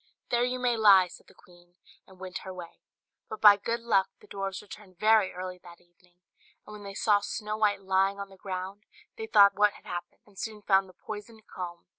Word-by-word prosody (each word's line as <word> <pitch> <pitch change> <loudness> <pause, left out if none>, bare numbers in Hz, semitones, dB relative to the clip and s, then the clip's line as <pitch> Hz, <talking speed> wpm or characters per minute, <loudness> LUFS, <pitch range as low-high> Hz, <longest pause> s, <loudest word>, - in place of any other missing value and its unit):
"There 240 0 +2
you 250 +1 -1
may 250 -1 +1
lie," 195 -4 +6
said - - -14
the - - -20
queen, 175 0 -22 0.3
and 190 -1 -18
went 185 -1 -6
her 190 - -8
way. 175 -2 -10 0.5
But 220 - -6
by 210 -1 +9
good 230 +3 -3
luck 200 -5 +2
the - - -18
dwarfs 195 -1 -5
returned 200 -3 -13
very 215 -1 +4
early 185 0 -7
that 175 -1 -15
evening; 175 0 -30 0.5
and 210 - -11
when 210 - -10
they 200 -1 -9
saw 210 -1 +3
Snow 210 +1 -4
White 205 -2 +1
lying 195 +1 +1
on 200 0 -6
the 195 - -15
ground, 190 +2 -7 0.3
they 445 -1 -5
thought 200 - +6
what 205 +1 +3
had - - -17
happened, 175 0 -7
and 200 -2 -16
soon 215 -2 -6
found 195 -1 +3
the - - -16
poisoned 215 +2 -10
comb. 175 -2 -8
195 Hz, 215 wpm, -28 LUFS, 185-210 Hz, 0.5 s, by